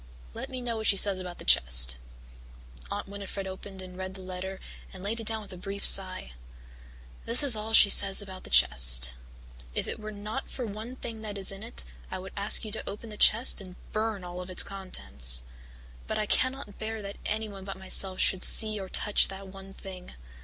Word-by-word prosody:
Let - - -7
me 255 -2 -6
know 235 -2 -3
what 220 -1 -3
she 200 - +3
says 195 -1 +4
about 180 -1 -8
the - - -11
chest." 60 0 +6 0.9
Aunt - - -5
Winnifred 200 0 -7
opened 190 0 -8
and 185 0 -11
read 185 0 -7
the 190 - -10
letter 185 +1 -7 0.3
and 190 -1 -11
laid 220 +3 -3
it 225 - -8
down 220 -1 -1
with 200 -2 -11
a - - -10
brief 195 +2 -6
sigh. 185 - +3 0.9
"This 235 +5 +4
is 270 -5 +7
all 215 +1 -4
she 205 -2 +9
says 195 -1 +4
about 190 -2 -6
the - - -8
chest. - - +5 0.6
'If - - -2
it - - -4
were 215 0 -7
not 210 +5 -7
for 250 - -5
one 220 +4 -8
thing 230 -4 -7
that 210 -2 -7
is 195 -1 +1
in 195 0 -10
it, 230 +2 -4 0.2
I 190 - -5
would 185 0 -10
ask 205 +3 +1
you 215 - -6
to 220 - -4
open 215 +2 -8
the - - -8
chest 225 +2 +4
and 185 -2 -12 0.2
burn 215 -3 -3
all 180 0 -7
its 180 0 +2
contents. 65 - -2 0.6
But - - -3
I 210 - -1
cannot 255 -2 0
bear 220 -1 -5
that 200 0 -8
anyone 210 -3 -4
but 195 0 -7
myself 190 0 -1
should 190 -1 +2
see 215 -1 +5
or 190 -1 -8
touch 210 +2 +2
that 195 0 -10
one 195 0 -12
thing. 190 - -11
195 Hz, 210 wpm, -27 LUFS, 185-215 Hz, 0.9 s, she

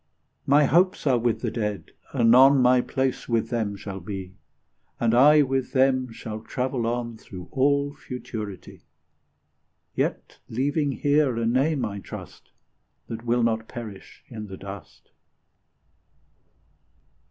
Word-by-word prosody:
My 145 +2 +5
hopes 180 +6 +2
are 130 -4 +3
with 120 -1 0
the - - -2
Dead; 105 -7 -3 0.2
anon 130 +2 +6
My 125 0 +5
place 130 0 -2
with 115 -1 0
them 110 -4 -1
will 95 -2 -5
be, 95 0 -7 0.7
And 115 -1 +2
I 145 +5 +7
with 135 -1 -2
them 130 -2 +2
shall 110 -1 -7
travel 125 +1 -2
on 120 -1 -3
Through 90 -4 -11
all 140 +1 +2
Futurity; 110 -7 -8 0.6
' - - -48 0.3
Yet - - -2
leaving 145 +4 0
here 145 -4 +2
a 115 - 0
name, 135 +4 +1
I 100 -1 -5
trust, - - -10 0.6
That 115 +1 -6
will 120 0 +2
not 110 -1 0
perish 110 -5 -9
in 110 -4 -8
the 95 -1 -8
dust. 100 0 -11
120 Hz, 130 wpm, -25 LUFS, 110-135 Hz, 0.7 s, I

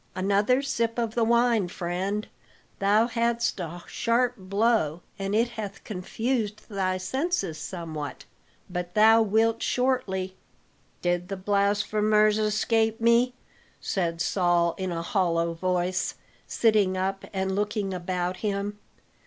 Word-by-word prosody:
Another 205 +8 +2
sip 230 -4 -1
of 230 -2 -1
the 235 - +1
wine, 235 -3 +3
friend; 185 +4 -3 0.5
thou 205 +3 +4
hadst 235 -2 0
a 175 0 -6
sharp 240 +1 +1
blow, 195 -4 +1 0.2
and 195 +1 -1
it 230 +2 +3
hath 205 -4 -7
confused 215 +2 -3
thy 190 -3 -1
senses 260 - -2
somewhat; 155 -4 -6 0.4
but 180 -1 -5
thou 220 +1 +7
wilt 225 +2 +2
shortly 190 -8 0 0.3
" - - -38
"Did 175 0 0
the 195 0 -4
blasphemers 210 +2 +2
escape 220 +1 +1
me?" 235 +2 +3 0.4
said 170 -4 -2
Saul 175 -2 +2
in 185 -1 -2
a 165 -1 -3
hollow 170 -3 +1
voice, 180 +1 -1 0.3
sitting 210 -5 +2
up 195 +1 -2
and 190 -1 -1
looking 205 -1 -1
about 180 0 -2
him. 205 0 -3
200 Hz, 125 wpm, -26 LUFS, 185-225 Hz, 0.5 s, thou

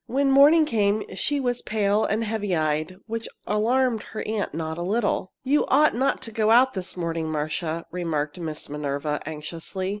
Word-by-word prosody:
When 270 +3 +2
morning 295 +4 +7
came 215 -5 +1
she 290 -1 0
was 245 -2 -1
pale 210 -1 +1
and 215 +2 0
heavy 210 -4 -1
eyed, 155 +2 -1
which 230 0 -4 0.2
alarmed 230 +2 +1
her 215 - -3
aunt 215 -2 -2
not 160 +1 -4
a - - -3
little. 200 0 0
"You 280 +3 +3
ought 300 +3 +4
not 260 0 0
go 215 -1 +1
out 250 +3 +5
this 185 -1 -5
morning, 165 -2 -2
Marcia," 155 +2 -2
remarked 160 -3 -2
Miss 155 -3 -5
Minerva, 145 0 -2
anxiously. 165 +5 -4
200 Hz, 170 wpm, -25 LUFS, 160-235 Hz, 0.2 s, morning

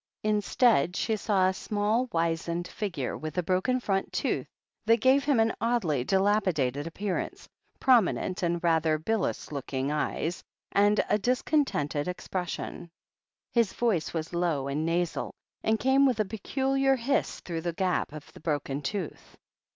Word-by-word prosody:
In 210 -1 +2
stead 205 - +3
she 220 - 0
saw 195 -3 +2
a 190 - +1
small, 215 +6 0
wizened 170 +1 -1
figure, 180 - -3
with 155 +2 -6
a 180 - +2
broken 185 +9 +1
front 195 -5 -1
tooth, - - -1 0.4
that 230 +1 +6
gave 265 +4 +4
him 280 -5 +3
an 225 0 +3
oddly 215 - +1
dilapidated 185 - +1
ap 165 - -9
pearance, 200 -2 -3 0.3
prominent 220 -7 +3
and 175 -1 0
rather 160 -2 +3
bilious 205 +4 -2
looking 135 -1 -3
eyes, 155 +3 -2 0.3
and 205 +1 +3
a 210 - +2
discontented 240 - 0
expression. 180 -1 -4 0.6
His 230 -5 +2
voice 215 -10 0
was 165 0 -4
low 165 -6 0
and 150 +3 -1
nasal, 170 0 -1 0.3
and 220 0 +2
came 270 +1 +4
with 245 -4 0
a 215 - +2
peculiar 270 +6 +1
hiss 265 +3 -1
through 165 -2 -5
the 170 +1 -2
gap 185 -2 0
of 150 -1 -10
the - - -13
broken 145 -3 -2
tooth. 180 +4 -5
185 Hz, 150 wpm, -28 LUFS, 160-225 Hz, 0.6 s, that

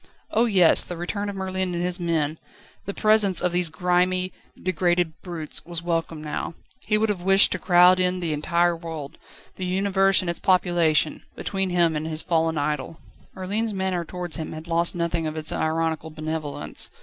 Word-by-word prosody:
Oh 230 +2 +3
yes; 185 -7 +5
the 175 - -7
return 200 +4 -3
of 200 - -5
Merlin 190 -1 -2
and 170 - -2
his 180 +1 -1
men, 160 -3 -1 0.5
the 200 - -4
presence 215 -3 +4
of 180 - +1
these 175 -1 +1
grimy, 180 +2 +1 0.3
degraded 175 -3 0
brutes, 170 -4 -4
was 170 -1 -4
welcome 165 -2 -2
now. 150 +2 -4 0.2
He 210 - 0
would 220 0 +1
have 195 -4 -1
wished 195 +2 +5
to 185 - -2
crowd 180 +1 +5
in 180 0 +1
the 165 -3 -1
entire 170 +3 +1
world, 160 -4 -7 0.4
the 185 - -3
universe 195 +1 +3
and 185 - -5
its 170 - -2
population, 175 -4 +2
between 195 -1 -2
him 170 -2 +2
and 155 +1 -3
his 160 0 -2
fallen 165 -1 +1
idol. 150 +1 -2 0.4
Merlin's 205 +4 -2
manner 190 -2 -1
towards 175 0 -5
him 160 - -5
had 155 0 -8
lost 170 +1 0
nothing 170 -1 -1
of 155 0 -5
its 155 0 -3
ironical 160 0 -1
benevolence. 155 -1 -4
175 Hz, 180 wpm, -24 LUFS, 160-185 Hz, 0.5 s, yes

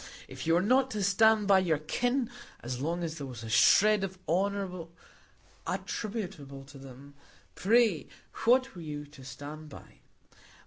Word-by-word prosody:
If - - -8
you 165 - +4
were 175 - +2
not 260 +5 +3
to 205 - -1
stand 210 +2 +4
by 195 -1 +6
your 170 -5 +1
"kin" 245 - -1 0.3
as 125 +1 -5
long 170 +4 -2
as 165 -1 -4
there 140 - -5
was 120 -3 -8
a 110 - -7
shred 205 - +5
of 190 -1 -4
honour 185 0 -1 0.8
attributable 180 -11 -5
to 135 0 -14
them, 135 +1 -13 0.4
pray 215 -4 +2 0.4
what 255 +3 +4
were 175 - -9
you 150 -2 -6
to 145 -2 -15
stand 145 +4 -9
by? - - -14
175 Hz, 160 wpm, -30 LUFS, 145-210 Hz, 0.8 s, by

